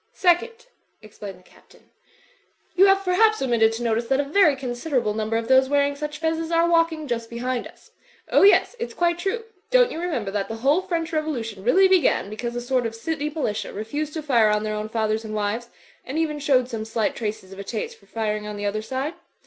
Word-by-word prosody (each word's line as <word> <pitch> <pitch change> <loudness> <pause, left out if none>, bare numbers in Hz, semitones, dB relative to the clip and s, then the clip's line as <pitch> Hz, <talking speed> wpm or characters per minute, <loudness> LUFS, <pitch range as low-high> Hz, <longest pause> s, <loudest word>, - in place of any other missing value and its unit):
"Second," 455 +7 +1 0.4
explained 205 -2 -9
the 185 - -22
Captain, - - -23 0.8
"you 385 +2 +6
have, 390 0 +3
per 365 - +1
haps, 435 +3 +4
omitted 235 -4 +3
to 230 +2 -4
notice 230 0 0
that 270 +2 +2
a - - +2
very 305 0 +4
considerable 250 -2 -2
num 215 0 -3
ber 225 - +1
of 230 0 -3
those 260 +1 +5
wearing 285 0 +2
such 300 +1 -5
fezzes 325 0 -1
are 335 0 +3
walking 330 -2 +1
just 230 -2 -3
be 235 - -7
hind 250 0 -2
us. - - -20 0.4
Oh, - - +5
yes, 405 +4 +5
it's 470 - -5
quite 345 0 +1
true. 395 +5 -2 0.3
Don't - - +4
you 325 - -5
remember 250 - -2
that 200 -1 -2
the 225 - -5
whole 275 +10 +2
French 335 -3 -3
Revolution 240 -11 -3
really 380 - +5
began 360 - +2
be - - -5
cause 240 +1 -4
a 240 - -2
sort 245 -1 0
of 225 - -8
City 295 +5 -3
Militia 285 -9 -3
refused 290 +9 -4
to 315 - -4
fire 235 -7 +4
on 210 0 +1
their 215 0 -2
own 210 0 -4
fathers 220 0 -1
and 215 -1 -6
wives; 215 +3 -2 0.3
and 270 +4 -5
even 310 -2 -1
showed 260 -4 +2
some 225 -3 -4
slight 225 0 -1
traces 210 -4 -5
of 195 - -11
a - - -5
taste 215 +2 -5
for 195 - -24
firing 215 -1 -3
on 210 0 -6
the 205 - -4
other 210 +1 -1
side? 265 +7 -3
255 Hz, 230 wpm, -23 LUFS, 220-320 Hz, 0.8 s, you